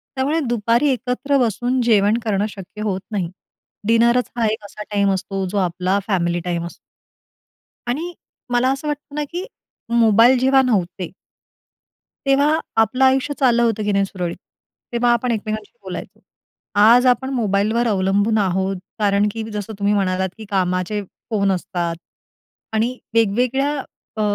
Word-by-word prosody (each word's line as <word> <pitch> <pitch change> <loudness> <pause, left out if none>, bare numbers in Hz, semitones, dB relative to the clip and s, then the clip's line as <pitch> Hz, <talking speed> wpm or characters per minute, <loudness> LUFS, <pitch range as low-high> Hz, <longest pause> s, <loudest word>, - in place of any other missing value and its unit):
त्यामुळे 280 +5 +1
दुपारी 235 +4 +2
एकत्र 255 +3 0
बसून 245 +4 0
जेवण 215 -2 +3
करणं 205 -2 0
शक्य 205 +1 -10
होत 195 -3 -1
नाही. 185 -5 -2 0.6
डिनरच 235 +2 +3
हा 230 - +2
एक 220 0 -4
असा 205 +1 -8
टाईम 200 -1 +2
असतो, 195 0 -3
जो 200 +3 -3
आपला 185 +1 0
फॅमिली 175 -4 +1
टाईम 170 -1 -2
असतो. 170 - -9 1.1
आणि 320 +8 -2 0.4
मला 245 +1 +3
असं 275 +3 -3
वाटतं 290 0 -5
ना, 300 - -1
की 355 +3 -4 0.4
मोबाईल 235 +2 +5
जेव्हा 265 +1 +4
नव्हते 185 -8 -1 1.1
तेव्हा 285 +3 +3 0.2
आपलं 255 +4 +1
आयुष्य 265 +2 +2
चाललं 240 -3 +4
होतं 225 -2 +1
की 210 - 0
नाही 200 0 +2
सुरळीत? 180 -3 -4 0.6
तेव्हा 240 0 +2
आपण 235 +1 0
एकमेकांशी 215 -1 -3
बोलायचो. - - -7 0.6
आज 235 +4 +7
आपण 255 +1 +2
मोबाईलवर 220 0 +1
अवलंबून 200 +2 +2
आहोत, 190 0 0 0.2
कारण 205 0 +3
की 225 0 -5
जसं 210 +1 -5
तुम्ही 205 +1 +2
म्हणालात 190 -1 0
की 220 - -9
कामाचे 185 +1 0 0.3
फोन 200 -3 +1
असतात 175 -2 -2 0.8
आणि 235 +4 0 0.2
वेगवेगळ्या 250 +6 +2 0.4
अ, - - 0
220 Hz, 145 wpm, -20 LUFS, 195-250 Hz, 1.1 s, आज